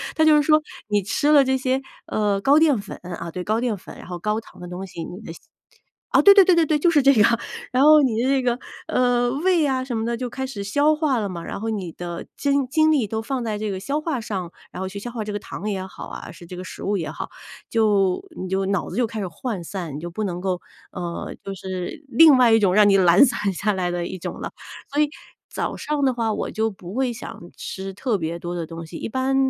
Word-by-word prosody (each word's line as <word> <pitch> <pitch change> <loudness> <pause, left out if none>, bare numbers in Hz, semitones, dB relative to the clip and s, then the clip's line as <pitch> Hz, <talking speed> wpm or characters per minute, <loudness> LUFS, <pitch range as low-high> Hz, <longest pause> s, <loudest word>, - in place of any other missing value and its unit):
它 315 - +3
就 310 -1 +6
是 295 - +4
说 305 +1 +4 0.3
你 205 -1 +2
吃 205 +9 -1
了 290 -2 +7
这 265 0 +1
些， 260 +1 0 0.2
呃， 205 -2 0
高 280 +9 +5
淀 305 -6 +4
粉， 200 0 -8
啊， 170 -1 -6
对， 180 +2 -5
高 215 +4 0
淀 240 -3 0
粉， 185 - -12
然 - - -11
后 175 -1 -6
高 210 +4 0
糖 225 - -15
的 175 - -7
东 180 +2 -6
西， 170 -2 -7
你 180 +3 -8
的 165 - -8 0.8
哦， - - +7
对 400 - +9
对 395 - +8
对 370 - +5
对 335 - +5
对， 305 0 +3
就 335 +4 +3
是 300 -3 +4
这 275 +1 +6
样， 230 +1 +4 0.3
然 255 +2 +3
后 305 0 +8
你 230 -4 +1
的 255 - +1
这 270 -1 +2
个， 245 0 0 0.3
呃， 245 -1 +2
胃 330 +4 +2
呀 265 -2 +1
什 250 -3 -3
么 220 - -1
的 235 0 -1
就 250 +1 -4
开 265 +2 -4
始 215 -7 -5
消 285 +9 +3
化 300 -4 +1
了 210 -3 -1
嘛， 175 -3 -6
然 - - -5
后 225 +2 -3
你 190 -6 -4
的 175 0 -7
精 280 -2 +1
精 310 +4 +3
力 270 -8 +2
都 220 +2 -3
放 250 +2 -3
在 215 -2 -2
这 210 0 -3
个 190 - -4
消 280 +10 -2
化 305 -6 -2
上， 195 -7 -4 0.2
然 - - -8
后 190 - -2
去 200 +2 -6
消 240 - -6
化 230 -2 -4
这 210 0 -5
个 205 - -2
糖 205 - -7
也 190 -2 -3
好 - - -9
啊， - - -8
是 175 - -13
这 180 - -9
个 180 - -6
食 - - -9
物 205 +1 0
也 165 - -3
好， - - -6 0.4
就 205 - +2
你 185 - -4
就 190 +1 0
脑 195 0 -1
子 - - -6
就 245 -1 +2
开 220 0 -6
始 - - -2
涣 185 +2 -5
散， 170 -5 -5
你 - - -5
就 170 +2 -6
不 215 +5 -3
能 180 -3 -3
够， 185 -1 -2 0.3
呃， 175 -2 -5
就 195 - -5
是 185 - -6
另 310 -1 +7
外 245 -3 +5
一 225 - +6
种 190 -3 +3
让 210 -1 +7
你 200 - +5
懒 185 +4 +7
散 210 -6 0
下 210 +3 0
来 185 -2 -1
的 175 -1 -2
一 185 - -6
种 - - -6
了， - - -5 0.4
所 295 - +3
以 300 - +2 0.4
早 - - -3
上 300 -1 -2
的 260 -2 +3
话 225 -2 0
我 - - -3
就 220 +1 -1
不 190 0 -10
会 255 -2 0
想 230 - -9 0.2
吃 195 0 -6
特 220 +2 -1
别 170 -1 -3
多 175 +1 -5
的 170 -2 -3
东 165 +1 -8
西， 165 - -8
一 - - -4
般 260 +3 0
215 Hz, 285 characters per minute, -23 LUFS, 185-265 Hz, 0.8 s, 对